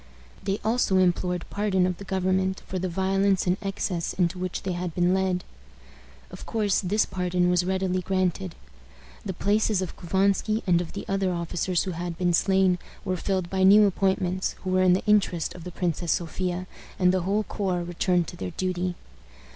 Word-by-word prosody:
They 195 +1 -2
also 220 -4 +2
implored 180 -1 +1
pardon 200 -3 +1
of 180 -1 -1
the - - -9
government 190 0 0
for 185 - -4
the 185 +1 -2
violence 195 +2 +1
and 180 0 +2
excess 195 -4 -2
into 180 0 0
which 185 -1 -3
they 190 - -2
had 175 -2 -4
been 180 0 +3
led. 190 -1 0 0.9
Of - - -10
course, 210 -3 +1
this 205 +3 +1
pardon 180 -1 0
was 180 0 +3
readily 190 -1 0
granted. 180 - -1 0.7
The 190 - -4
places 210 +1 +1
of 185 -2 -4
Couvansky 195 +4 +1
and 175 -3 +3
of 170 - -7
the 200 - -6
other 195 -1 0
officers 175 +1 -1
who 190 - -3
had 170 0 -5
been 175 0 +1
slain 190 0 +3 0.3
were 185 -2 0
filled 185 0 -1
by 190 -1 0
new 205 +3 +7
appointments, 190 -1 0
who 185 - -2
were 185 0 +3
in 185 -1 +5
the 185 - 0
interest 200 -6 +2
of 175 -2 -11
the 180 - -6
Princess 170 -1 -1
Sophia, 180 +1 -2 0.3
and 180 -1 +3
the 185 - +1
whole 200 +4 0
corps 185 -5 -2
returned 175 0 0
to - - -9
their 90 -1 -5
duty. 185 -1 -1
185 Hz, 185 wpm, -26 LUFS, 180-195 Hz, 0.9 s, new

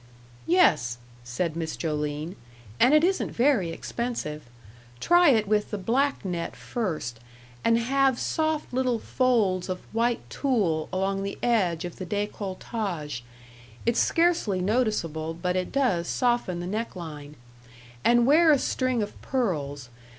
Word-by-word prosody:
"Yes," 155 - +3 0.3
said 150 +7 -2
Miss 165 -1 -3
Joline, 150 +2 -3 0.4
"and 255 - +6
it 305 - +5
isn't 380 +2 +1
very 235 -8 +2
expensive. 165 -5 -4 0.6
Try 350 -1 +5
it 220 -5 +3
with 210 0 +1
the 210 - -3
black 250 +5 0
net 170 -9 -3
first, 125 - -4 0.4
and 230 0 +4
have 265 +2 +2
soft 315 -1 -1
little 255 -2 +1
folds 220 -8 +1
of 185 0 -3
white 230 +1 0
tulle 195 - 0
along 195 +1 -1
the 200 0 -4
edge 185 -8 +1
of 175 - -7
the 185 - -5
décolletage 195 - -3 0.6
it's 235 0 +2
scarcely 330 - +2
noticeable, 180 -7 0
but 180 +2 -2
it 185 -1 -1
does 200 -12 +1
soften 240 -8 0
the - - -4
neck 215 +5 -3
line. 150 -4 -8 0.7
And 240 0 +5
wear 315 +4 +6
a 290 - +6
string 255 -3 0
of 205 - -8
pearls. 145 - -2
205 Hz, 135 wpm, -26 LUFS, 170-245 Hz, 0.7 s, and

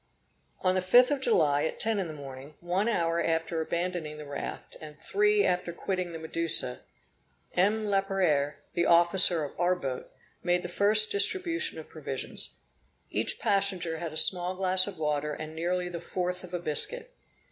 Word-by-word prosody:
On 185 -1 +2
the 185 - 0
5th 245 +8 +5
of 285 -2 -1
July, 150 - +2
at - - -5
ten 220 -2 +2
in 190 - -3
the 155 - -8
morning, 140 +1 -11
one 180 +5 -1
hour 170 -5 0
after 165 0 -1
abandoning 170 -2 -4
the 150 - -9
raft, 140 0 -7
and 150 -1 -11
three 415 +1 +1
after 180 -1 -1
quitting 180 0 -4
the 165 - -7
Medusa, 160 - 0 0.7
M. 210 +4 +1
Laperere, 190 -8 0 0.2
the 170 - 0
officer 170 -1 +4
of 145 - -7
our 175 +1 +2
boat, 135 -7 -6 0.3
made 175 0 0
the - - -4
first 210 +4 +5
distribution 340 - 0
of - - -9
provisions. - - 0 0.5
Each - - +1
passenger 190 -5 0
had 165 -2 -5
a 155 - -6
small 180 +1 +6
glass 185 0 +2
of 200 - -8
water 150 -1 -2
and 155 +1 -8
nearly 180 +2 -2
the 170 -1 -7
fourth 180 +1 -4
of 180 - -11
a 180 - -2
biscuit. 485 - -2
175 Hz, 170 wpm, -28 LUFS, 160-195 Hz, 0.7 s, small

